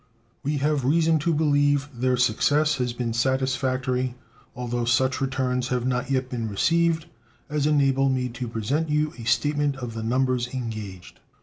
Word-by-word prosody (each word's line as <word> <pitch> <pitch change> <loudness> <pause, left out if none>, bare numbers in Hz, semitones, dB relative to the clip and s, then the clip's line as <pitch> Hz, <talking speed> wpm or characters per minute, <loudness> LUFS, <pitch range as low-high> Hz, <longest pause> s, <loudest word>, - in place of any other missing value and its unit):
We 145 +2 -1
have 145 -1 0
reason 160 +3 +3
to 170 +3 0
believe 145 -2 +2
their 125 +1 0
success 145 +5 +2
has 125 -1 -1
been 120 -1 -3
satisfactory, 130 0 0 0.4
although 120 -1 -2
such 130 +3 +1
returns 130 -2 -1
have 125 -1 -1
not 125 +1 -1
yet 130 -1 0
been 115 -3 -3
received 165 +9 +1 0.5
as 150 -1 +1
enable 135 -2 +3
me 130 -1 0
to 125 +1 -5
present 125 +8 -1
you 150 +1 +1
a 115 - -7
statement 145 +3 +1
of 125 -3 -6
the 115 - -5
numbers 125 +1 0
engaged. 110 -7 -6
130 Hz, 160 wpm, -25 LUFS, 125-145 Hz, 0.5 s, reason